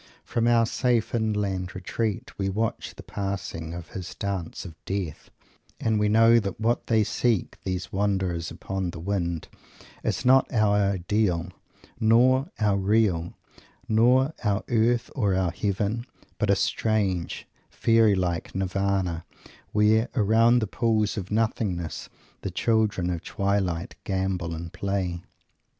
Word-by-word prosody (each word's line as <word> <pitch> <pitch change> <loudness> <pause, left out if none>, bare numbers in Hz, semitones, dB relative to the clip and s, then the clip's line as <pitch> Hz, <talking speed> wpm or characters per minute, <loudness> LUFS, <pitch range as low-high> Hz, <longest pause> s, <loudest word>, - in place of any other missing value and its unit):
From 115 -1 0
our 115 -1 +5
safe 120 0 0
inland 105 -5 -1
retreat 110 +5 -3
we 95 -1 0
watch 110 +3 -2
the - - -10
passing 95 -5 -4
of 85 -1 -8
his 95 -2 -7
Dance 95 -4 -4
of 85 - -8
Death, 95 -6 -4 0.5
and 110 -1 +1
we 105 0 +2
know 115 +2 +6
that 100 -3 -4
what 115 +2 0
they 110 -2 +3
seek, 110 -1 0
these 95 -1 -4
wanderers 95 -4 0
upon 95 -2 -4
the 85 - -7
wind, 85 -3 -2 0.6
is - - -1
not 130 +1 +5
our 105 -3 +3
Ideal 100 -2 +1 0.5
nor 130 +6 +4
our 105 -2 +2
Real, 95 -4 +1 0.5
not 125 +6 +4
our 105 -1 +1
Earth 120 +1 +2
or 100 -7 +1
our 95 -2 +1
Heaven, 105 +5 -2 0.3
but 105 - +1
a 100 - +5
strange, 100 -4 0 0.2
fairy 115 -3 +3
like 90 -2 -2
Nirvana, 95 -2 -1 0.5
where, 110 +2 +3
around 115 +2 +4
the - - +1
pools 110 0 0
of 100 -3 -5
Nothingness, 105 -6 -1 0.3
the - - -3
children 110 -6 +1
of 85 -2 -3
twilight 100 -3 -1
gambol 95 -3 -2
and 85 +1 -7
play. 95 -3 -2
100 Hz, 135 wpm, -26 LUFS, 95-110 Hz, 0.6 s, know